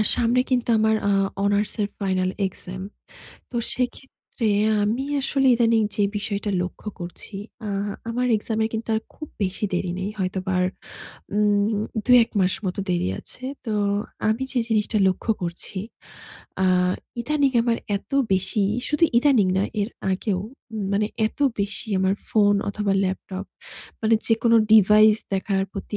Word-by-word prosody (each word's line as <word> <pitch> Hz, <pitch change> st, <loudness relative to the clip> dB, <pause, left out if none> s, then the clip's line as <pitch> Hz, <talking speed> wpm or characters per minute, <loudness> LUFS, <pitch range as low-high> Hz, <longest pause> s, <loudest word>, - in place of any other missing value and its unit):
সামনে 240 Hz, +1 st, +2 dB
কিন্তু 245 Hz, -2 st, 0 dB
আমার 220 Hz, 0 st, +3 dB
আ -, -, +3 dB, 0.3 s
অনার্সের 205 Hz, +1 st, +1 dB
ফাইনাল 185 Hz, -2 st, 0 dB, 0.2 s
এক্সাম। 185 Hz, 0 st, -6 dB, 0.7 s
তো -, -, -7 dB, 0.2 s
সেক্ষেত্রে 250 Hz, -2 st, -4 dB, 0.4 s
আমি 230 Hz, +6 st, 0 dB, 0.2 s
আসলে 270 Hz, 0 st, +1 dB
ইদানিং 230 Hz, -1 st, +3 dB
যে 205 Hz, -, +2 dB
বিষয়টা 205 Hz, 0 st, -3 dB
লক্ষ্য 180 Hz, +4 st, -6 dB
করছি, 175 Hz, +4 st, -8 dB, 0.3 s
আ -, -, -3 dB, 0.4 s
আমার 250 Hz, +2 st, 0 dB
এক্সামের 220 Hz, +1 st, 0 dB
কিন্তু 225 Hz, +1 st, -4 dB
আর 220 Hz, -, -1 dB
খুব 310 Hz, -, -8 dB, 0.2 s
বেশি 190 Hz, +3 st, -1 dB
দেরি 180 Hz, 0 st, -1 dB
নেই। 195 Hz, +2 st, -2 dB
হয়তোবা 185 Hz, 0 st, -2 dB
আর 180 Hz, -, +3 dB, 0.7 s
উম 210 Hz, 0 st, +2 dB, 0.2 s
২ -, -, -1 dB
১ 235 Hz, -, -22 dB
মাস 185 Hz, 0 st, +3 dB
মতো 185 Hz, +2 st, -2 dB
দেরি 175 Hz, -, 0 dB
আছে। 255 Hz, -, -9 dB, 0.2 s
তো 220 Hz, -, -3 dB, 0.6 s
আমি 225 Hz, +4 st, 0 dB
যে 250 Hz, -, +1 dB
জিনিসটা 215 Hz, -1 st, +1 dB
লক্ষ্য 190 Hz, +4 st, -2 dB
করছি, 175 Hz, +3 st, -5 dB, 0.9 s
আ -, -, +4 dB, 0.6 s
ইদানিং 285 Hz, +1 st, +1 dB
আমার 235 Hz, -1 st, +1 dB, 0.2 s
এত -, -, -11 dB, 0.2 s
বেশি, 190 Hz, +2 st, +1 dB, 0.3 s
শুধু 300 Hz, +3 st, +3 dB
ইদানিং 245 Hz, -8 st, +4 dB
নয়, 200 Hz, -, 0 dB
এর 200 Hz, -, 0 dB, 0.2 s
আগেও 185 Hz, 0 st, -1 dB, 0.5 s
মানে 210 Hz, +1 st, +2 dB, 0.2 s
এত -, -, -8 dB, 0.2 s
বেশি 200 Hz, +2 st, -3 dB
আমার 190 Hz, +1 st, +2 dB, 0.2 s
ফোন 205 Hz, -2 st, +4 dB
অথবা 200 Hz, -1 st, -1 dB
ল্যাপটপ, 190 Hz, +1 st, -4 dB, 0.6 s
মানে 225 Hz, +1 st, +4 dB
যেকোনো 230 Hz, 0 st, +4 dB, 0.2 s
ডিভাইস 215 Hz, +1 st, +7 dB, 0.2 s
দেখার 195 Hz, 0 st, 0 dB
প্রতি 205 Hz, +1 st, -5 dB
210 Hz, 145 wpm, -23 LUFS, 190-230 Hz, 0.9 s, ডিভাইস